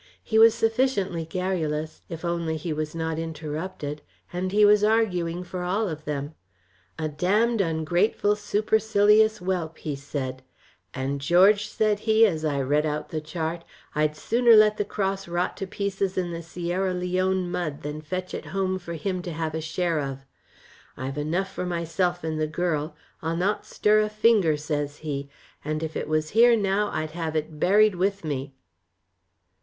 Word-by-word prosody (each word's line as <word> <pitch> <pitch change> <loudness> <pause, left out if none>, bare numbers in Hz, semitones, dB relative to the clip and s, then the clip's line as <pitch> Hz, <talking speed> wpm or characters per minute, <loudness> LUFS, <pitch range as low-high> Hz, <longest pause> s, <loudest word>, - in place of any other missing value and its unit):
He 220 - +2
was 225 0 +7
sufficiently 225 -7 0
garrulous, 160 -3 -2
if 165 0 -6
only 170 -2 -1
he 160 +1 -3
was 155 +1 -4
not 160 -1 -2
interrupted, 155 -1 -5 0.3
and 185 +1 -2
he 210 +1 +5
was 210 0 +5
arguing 180 -6 +1
for 180 0 -6
all 195 +5 0
of 155 -3 -6
them. 145 0 -3 0.6
"'A 155 -1 -2
damned 205 +9 +2
ungrateful, 175 +5 +1
supercilious 215 0 +3
whelp,' 180 -4 -3
he 150 -2 -4
said; 135 -2 -5 0.5
'and 135 +3 -3
George,' 195 +7 +5
said 210 -1 +1
he, 220 +1 +5
as 160 -7 0
I 145 -3 0
read 145 +3 +2
out 150 0 -3
the 155 - -3
chart, 165 +1 -4 0.3
'I'd 150 0 +1
sooner 235 +7 +4
let 215 0 +6
the 205 - 0
cross 195 -2 -2
rot 175 +1 -1
to 195 - -4
pieces 195 -1 -2
in 180 -2 -1
the 170 0 -5
Sierra 175 +3 -2
Leone 185 0 0
mud 155 -6 -3
than 150 +1 -5
fetch 185 +4 -5
it - - -5
home 185 -1 -1
for 170 -2 -7
him 185 +3 -2
to 175 - -5
have 160 -1 -3
a 160 - -2
share 165 0 -1
of. 135 -1 -5 0.7
I've 135 +2 -4
enough 180 +6 -1
for 180 - -3
myself 175 +1 -1
and 155 -1 -2
the 155 - +1
girl. 155 -2 -2 0.3
I'll 165 +1 -2
not 200 +4 -1
stir 210 0 +3
a 215 0 +1
finger,' 215 -7 +3
says 145 -1 -3
he, 140 -2 -3 0.3
'and 155 +1 -2
if 160 0 -4
it - - -3
was 155 0 0
here 235 +1 +6
now 200 0 +1
I'd 155 0 -3
have 160 -1 -4
it 155 0 -3
buried 210 +4 +5
with 195 +2 -1
me.' 140 -3 -4
175 Hz, 170 wpm, -25 LUFS, 155-200 Hz, 0.7 s, was